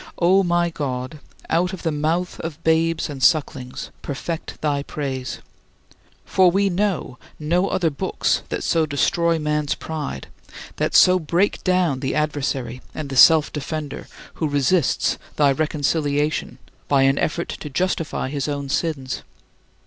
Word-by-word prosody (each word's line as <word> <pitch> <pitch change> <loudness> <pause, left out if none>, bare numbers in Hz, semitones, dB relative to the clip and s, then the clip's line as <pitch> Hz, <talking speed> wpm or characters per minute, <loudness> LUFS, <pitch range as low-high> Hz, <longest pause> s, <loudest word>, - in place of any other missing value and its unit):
O 185 +3 +4
my 175 -1 +1
God, 130 -1 -4 0.3
out 180 +3 +1
of 190 - -7
the 165 - 0
mouth 160 +4 -1
of 165 0 -6
babes 165 0 +2
and 140 -3 -7
sucklings, 135 -5 +1
perfect 155 +4 -5
thy 145 -2 0
praise. 135 -3 -4 0.9
For 185 -1 +4
we 195 +2 +2
know 180 -9 -1 0.2
no 175 +5 +1
other 170 -5 +1
books 140 - 0
that - - -3
so 160 -1 +2
destroy 165 +3 +1
man's 150 -1 0
pride, 150 - -5 0.5
that - - -1
so 185 0 +7
break 175 +5 0
down 180 -7 +2
the 135 +1 -2
adversary 135 -5 -2
and 150 -3 -5
the - - -3
self 155 +3 +7
defender 150 0 -5 0.3
who 155 - +1
resists 145 +2 +1 0.2
thy 145 -2 +4
reconciliation 150 0 0 0.3
by 140 -2 +4
an 135 +1 +3
effort 170 +2 -1
to 150 - -6
justify 165 -3 -1
his 140 0 -2
own 140 -1 -3
sins. 145 -3 -2
155 Hz, 140 wpm, -22 LUFS, 140-170 Hz, 0.9 s, so